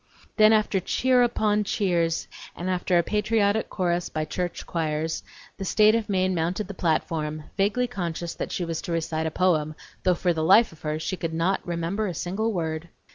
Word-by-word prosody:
Then 215 Hz, -1 st, +7 dB
after 215 Hz, -3 st, +3 dB
cheers 250 Hz, +6 st, +3 dB
upon 210 Hz, -3 st, +1 dB
cheers 175 Hz, -5 st, 0 dB, 0.3 s
and 180 Hz, +2 st, -3 dB
after 180 Hz, 0 st, +1 dB
a 170 Hz, -, +4 dB
patriotic 210 Hz, +1 st, +1 dB
chorus 175 Hz, -2 st, -1 dB
by 155 Hz, -, -2 dB
the -, -, -20 dB
church 180 Hz, -1 st, -3 dB
choirs, 160 Hz, -1 st, -2 dB, 0.4 s
the 195 Hz, -, -5 dB
State 215 Hz, +3 st, +4 dB
of 225 Hz, -2 st, -1 dB
Maine 185 Hz, -1 st, +1 dB
mounted 175 Hz, +4 st, -1 dB
the 200 Hz, -, -6 dB
platform, 155 Hz, -3 st, -1 dB
vaguely 205 Hz, +5 st, +1 dB
conscious 175 Hz, -7 st, -4 dB
that -, -, -5 dB
she 175 Hz, -, -2 dB
was 165 Hz, -1 st, -3 dB
to -, -, -6 dB
recite 160 Hz, -1 st, -1 dB
a -, -, 0 dB
poem, 155 Hz, -3 st, +1 dB, 0.3 s
though 180 Hz, -1 st, +3 dB
for 175 Hz, 0 st, +1 dB
the 160 Hz, -1 st, -2 dB
life 220 Hz, +8 st, +6 dB
of 160 Hz, -, -17 dB
her 155 Hz, 0 st, -2 dB
she 185 Hz, +4 st, -3 dB
could 165 Hz, -2 st, -3 dB
not 180 Hz, +4 st, +1 dB
remember 175 Hz, +5 st, -1 dB
a 180 Hz, -, -4 dB
single 200 Hz, +8 st, -1 dB
word. 165 Hz, -3 st, -3 dB
180 Hz, 195 wpm, -25 LUFS, 165-205 Hz, 0.4 s, Then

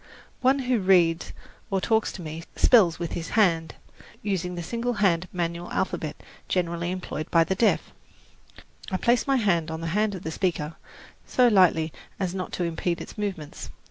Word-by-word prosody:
One 265 Hz, +2 st, +4 dB
who 250 Hz, -2 st, +2 dB
reads 180 Hz, -3 st, +3 dB, 0.4 s
or 195 Hz, -, +1 dB
talks 220 Hz, +3 st, +1 dB
to 185 Hz, -, -8 dB
me 160 Hz, +1 st, -6 dB
spells 195 Hz, -10 st, +5 dB
with 170 Hz, -1 st, -4 dB
his 165 Hz, -1 st, -4 dB
hand, 165 Hz, -6 st, +3 dB, 0.5 s
using 180 Hz, -3 st, -2 dB
the 175 Hz, -, -4 dB
single 235 Hz, +7 st, -2 dB
hand 185 Hz, -5 st, +2 dB
manual 170 Hz, -1 st, -3 dB
alphabet -, -, -2 dB, 0.3 s
generally 170 Hz, -1 st, -1 dB
employed 180 Hz, -4 st, -4 dB
by 165 Hz, -1 st, +5 dB
the 190 Hz, -, -1 dB
deaf. 220 Hz, +4 st, +1 dB, 1.0 s
I 190 Hz, -, -1 dB
place 240 Hz, +6 st, +2 dB
my 275 Hz, -, +3 dB
hand 175 Hz, -9 st, +1 dB
on 160 Hz, 0 st, -5 dB
the 165 Hz, -, -3 dB
hand 210 Hz, 0 st, +1 dB
of 185 Hz, -, -8 dB
the 160 Hz, -, -3 dB
speaker 165 Hz, -3 st, -1 dB, 0.5 s
so 250 Hz, -1 st, +4 dB
lightly 170 Hz, -6 st, +4 dB, 0.3 s
as 185 Hz, -2 st, -1 dB
not 185 Hz, -1 st, -4 dB
to 180 Hz, -, -1 dB
impede 170 Hz, +1 st, -1 dB
its -, -, -9 dB
movements. 195 Hz, -8 st, -5 dB
180 Hz, 175 wpm, -26 LUFS, 165-205 Hz, 1.0 s, spells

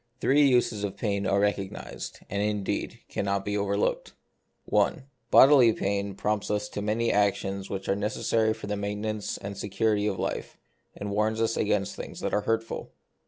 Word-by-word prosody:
Three 140 Hz, +3 st, +4 dB
uses 120 Hz, -5 st, +2 dB
of 100 Hz, -1 st, -3 dB
pain 100 Hz, -3 st, -1 dB
are 100 Hz, -, +2 dB
recognised, 100 Hz, -1 st, -3 dB
and 100 Hz, +1 st, -2 dB
indeed 105 Hz, -2 st, -2 dB
cannot 100 Hz, 0 st, -1 dB
be 105 Hz, -, -1 dB
over 100 Hz, 0 st, 0 dB
looked: -, -, -1 dB, 0.3 s
— -, -, -18 dB
I. -, -, +2 dB, 0.3 s
Bodily 130 Hz, -4 st, +7 dB
pain 100 Hz, -1 st, -2 dB
prompts 105 Hz, 0 st, -1 dB
us 105 Hz, 0 st, 0 dB
to 100 Hz, -, -4 dB
many 110 Hz, +3 st, +1 dB
actions 100 Hz, -1 st, 0 dB
which 95 Hz, -1 st, -4 dB
are 95 Hz, -, +2 dB
necessary 110 Hz, +2 st, +1 dB
for 110 Hz, -, -8 dB
the 105 Hz, 0 st, -2 dB
maintenance 105 Hz, +1 st, -3 dB
or 100 Hz, +1 st, -6 dB
security 105 Hz, +1 st, 0 dB
of 100 Hz, -3 st, -1 dB
life, -, -, -4 dB, 0.4 s
and 100 Hz, 0 st, -4 dB
warns 110 Hz, +2 st, +1 dB
us 115 Hz, 0 st, +1 dB
against 105 Hz, -2 st, 0 dB
things -, -, -7 dB
that -, -, -2 dB
are 105 Hz, -, +2 dB
hurtful. 115 Hz, +2 st, -2 dB
105 Hz, 175 wpm, -27 LUFS, 100-110 Hz, 0.4 s, Bodily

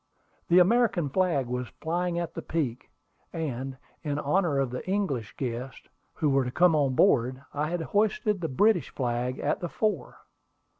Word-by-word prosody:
The 175 Hz, -, +5 dB
American 185 Hz, -, +4 dB
flag 165 Hz, -4 st, +1 dB
was 125 Hz, 0 st, -3 dB
flying 175 Hz, +2 st, -1 dB
at 170 Hz, -2 st, -3 dB
the -, -, -5 dB
peak, 135 Hz, -7 st, -3 dB, 0.4 s
and, 135 Hz, -4 st, -4 dB, 0.2 s
in 145 Hz, -3 st, -2 dB
honor 150 Hz, +1 st, +1 dB
of 135 Hz, -3 st, 0 dB
the 125 Hz, -, -4 dB
English 150 Hz, -, -1 dB
guests 125 Hz, 0 st, -5 dB, 0.3 s
who 150 Hz, -2 st, +1 dB
were 135 Hz, 0 st, +3 dB
to 125 Hz, -, -3 dB
come 175 Hz, +5 st, +4 dB
on 140 Hz, -4 st, +2 dB
board, 130 Hz, -7 st, +3 dB
I 150 Hz, +1 st, -1 dB
had 175 Hz, 0 st, -2 dB
hoisted 210 Hz, -, +1 dB
the 165 Hz, -, -1 dB
British 205 Hz, +5 st, +3 dB
flag 125 Hz, 0 st, -2 dB
at -, -, -1 dB
the 175 Hz, -, -4 dB
fore. 200 Hz, -, -2 dB
150 Hz, 165 wpm, -27 LUFS, 130-180 Hz, 0.4 s, The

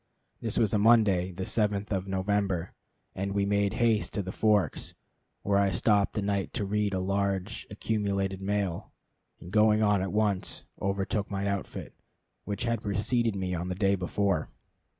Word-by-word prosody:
This -, -, -2 dB
was 110 Hz, -4 st, +2 dB
a 105 Hz, -, +3 dB
Monday, 100 Hz, -5 st, +4 dB
the 90 Hz, +1 st, -5 dB
7th 105 Hz, 0 st, 0 dB
of 95 Hz, -1 st, -1 dB
November, 95 Hz, -2 st, -1 dB, 0.4 s
and 100 Hz, +1 st, -3 dB
we 100 Hz, 0 st, +1 dB
made 100 Hz, -1 st, +1 dB
haste 115 Hz, -3 st, +1 dB
to 100 Hz, -, -1 dB
the 95 Hz, -, -5 dB
Forks, 105 Hz, -1 st, +1 dB, 0.5 s
where 100 Hz, 0 st, +2 dB
I 100 Hz, -1 st, +3 dB
stopped 100 Hz, +3 st, +2 dB
a 105 Hz, -, 0 dB
night 100 Hz, -1 st, -1 dB
to 105 Hz, -, -1 dB
read 105 Hz, 0 st, 0 dB
a -, -, 0 dB
large, 100 Hz, +1 st, -1 dB
accumulated 100 Hz, -2 st, -1 dB
mail, 100 Hz, -3 st, -2 dB, 0.5 s
and 85 Hz, -, -11 dB
going 105 Hz, +1 st, +4 dB
on 105 Hz, -2 st, +3 dB
at 95 Hz, -1 st, -2 dB
once, 105 Hz, -3 st, 0 dB, 0.2 s
overtook 100 Hz, +1 st, -1 dB
my 100 Hz, 0 st, -2 dB
outfit, 100 Hz, -1 st, -4 dB, 0.5 s
which 100 Hz, +1 st, -3 dB
had 115 Hz, -2 st, 0 dB
preceded 110 Hz, +2 st, 0 dB
me 95 Hz, -1 st, -2 dB
on 90 Hz, +1 st, -3 dB
the 90 Hz, -, -2 dB
day 95 Hz, +1 st, +2 dB
before. 95 Hz, -2 st, 0 dB
100 Hz, 170 wpm, -29 LUFS, 95-105 Hz, 0.5 s, Monday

